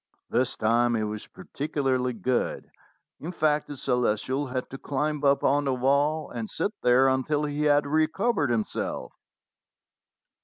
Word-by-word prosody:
This 130 Hz, +1 st, 0 dB
time 120 Hz, +2 st, +2 dB
he 110 Hz, -, 0 dB
was 105 Hz, 0 st, -5 dB
particularly 135 Hz, -4 st, -2 dB
good; 120 Hz, +3 st, -2 dB, 0.5 s
in 165 Hz, -, -5 dB
fact, 150 Hz, -3 st, +1 dB
the 145 Hz, -, -7 dB
Ce 135 Hz, -, -9 dB
lestial 125 Hz, +3 st, 0 dB
had 130 Hz, -1 st, -3 dB
to 135 Hz, -, -7 dB
climb 150 Hz, +1 st, -2 dB
up 140 Hz, 0 st, +3 dB
on 145 Hz, +1 st, +2 dB
the 135 Hz, -2 st, +1 dB
wall 140 Hz, +4 st, +1 dB
and 115 Hz, -3 st, -5 dB
sit 185 Hz, +6 st, -1 dB
there 125 Hz, +2 st, +5 dB
until 135 Hz, +3 st, +1 dB
he 150 Hz, +1 st, -2 dB
had 145 Hz, -1 st, +4 dB
recovered 155 Hz, -, +1 dB
himself. 115 Hz, -3 st, -2 dB
135 Hz, 150 wpm, -26 LUFS, 125-150 Hz, 0.5 s, there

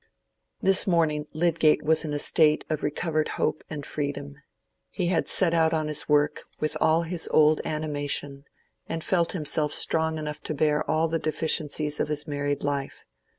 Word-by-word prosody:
This 195 Hz, +1 st, +4 dB
morning 155 Hz, -4 st, +1 dB
Lydgate 160 Hz, -1 st, +2 dB
was 160 Hz, +1 st, +2 dB
in 155 Hz, -, -4 dB
a 145 Hz, -, -1 dB
state 155 Hz, +1 st, +4 dB
of 155 Hz, -, -1 dB
recovered 155 Hz, +1 st, -1 dB
hope 155 Hz, 0 st, -1 dB
and 145 Hz, -3 st, -6 dB
freedom. 145 Hz, -, -4 dB, 0.5 s
He 175 Hz, -, -2 dB
had 180 Hz, -, 0 dB
set 175 Hz, -3 st, +3 dB
out 165 Hz, -1 st, +2 dB
on 155 Hz, -1 st, -1 dB
his 150 Hz, 0 st, -3 dB
work 150 Hz, 0 st, +1 dB
with 155 Hz, -, -1 dB
all 160 Hz, +2 st, +3 dB
his 170 Hz, 0 st, -1 dB
old 155 Hz, 0 st, +4 dB
animation, 145 Hz, -2 st, -3 dB, 0.4 s
and 165 Hz, -1 st, -4 dB
felt 170 Hz, -3 st, 0 dB
himself 150 Hz, -3 st, -1 dB
strong 160 Hz, +1 st, +1 dB
enough 150 Hz, -1 st, -5 dB
to 155 Hz, -, -4 dB
bear 150 Hz, +1 st, +1 dB
all 155 Hz, +1 st, +2 dB
the 165 Hz, 0 st, -1 dB
deficiencies 155 Hz, -1 st, 0 dB
of -, -, 0 dB
his 150 Hz, -1 st, -2 dB
married 145 Hz, -1 st, -3 dB
life. 140 Hz, -1 st, -3 dB
155 Hz, 170 wpm, -26 LUFS, 150-160 Hz, 0.5 s, This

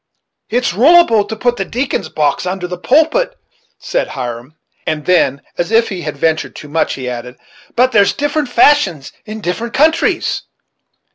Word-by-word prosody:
"It 245 Hz, +2 st, 0 dB
is -, -, +1 dB
ruleable 245 Hz, -, +5 dB
to 220 Hz, -, -3 dB
put 240 Hz, +2 st, 0 dB
the 195 Hz, -, -1 dB
deacons' 255 Hz, +7 st, -3 dB
box 150 Hz, +3 st, 0 dB
under 185 Hz, 0 st, -3 dB
the 180 Hz, 0 st, -6 dB
pulpit," 320 Hz, -, +2 dB, 0.4 s
said -, -, -2 dB
Hiram; 125 Hz, +1 st, -6 dB, 0.3 s
and 155 Hz, -2 st, -2 dB
then, 140 Hz, -6 st, +2 dB, 0.2 s
as 175 Hz, -, 0 dB
if 225 Hz, +1 st, +3 dB
he 190 Hz, -4 st, -5 dB
had 150 Hz, -3 st, -5 dB
ventured 160 Hz, +2 st, -1 dB
too 150 Hz, -, -10 dB
much, 160 Hz, +2 st, 0 dB
he 130 Hz, -2 st, -6 dB
added, 125 Hz, 0 st, -6 dB, 0.4 s
"but 255 Hz, +2 st, +3 dB
there's 200 Hz, -3 st, +4 dB
different 290 Hz, -1 st, -1 dB
fashions 230 Hz, -, +3 dB, 0.2 s
in 215 Hz, +1 st, -7 dB
different 225 Hz, +6 st, -3 dB
Countries." 320 Hz, +4 st, +2 dB
200 Hz, 165 wpm, -15 LUFS, 155-255 Hz, 0.4 s, ruleable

